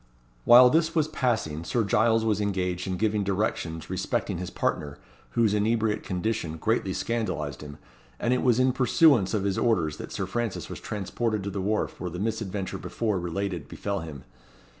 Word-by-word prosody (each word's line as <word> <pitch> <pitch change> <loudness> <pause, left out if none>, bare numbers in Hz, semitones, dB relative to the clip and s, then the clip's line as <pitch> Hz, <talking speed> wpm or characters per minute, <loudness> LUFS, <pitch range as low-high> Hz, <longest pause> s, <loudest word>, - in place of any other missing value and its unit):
While 125 +1 +9
this 165 +1 +2
was 155 -2 +3
passing, 110 - -1
Sir 115 +6 0
Giles 110 +2 +2
was 105 -2 +1
engaged 90 -2 -1
in 95 -1 -2
giving 105 +1 +1
directions 95 -5 -2
respecting 95 +1 -2
his 90 -1 -4
partner, 75 -4 -2 0.4
whose 110 -3 +4
inebriate 110 +1 +1
condition 90 -3 -2
greatly 105 +2 0
scandalized 95 - -2
him; 75 -1 -9 0.4
and 120 - +1
it 125 - +1
was 125 -2 +3
in 130 0 +3
pursuance 125 - +4
of 100 - 0
his 100 -2 0
orders 85 -10 +1
that - - -8
Sir 95 - -2
Francis 115 +2 -3
was - - -6
transported 105 +1 -2
to 100 - -3
the 95 0 -3
wharf 105 +3 -1
where 90 - -2
the 90 - -7
misadventure 105 -2 -3
before 110 -5 -2
related 90 -2 -3
befel 100 +4 -3
him. 75 -5 -8
100 Hz, 175 wpm, -27 LUFS, 90-115 Hz, 0.4 s, While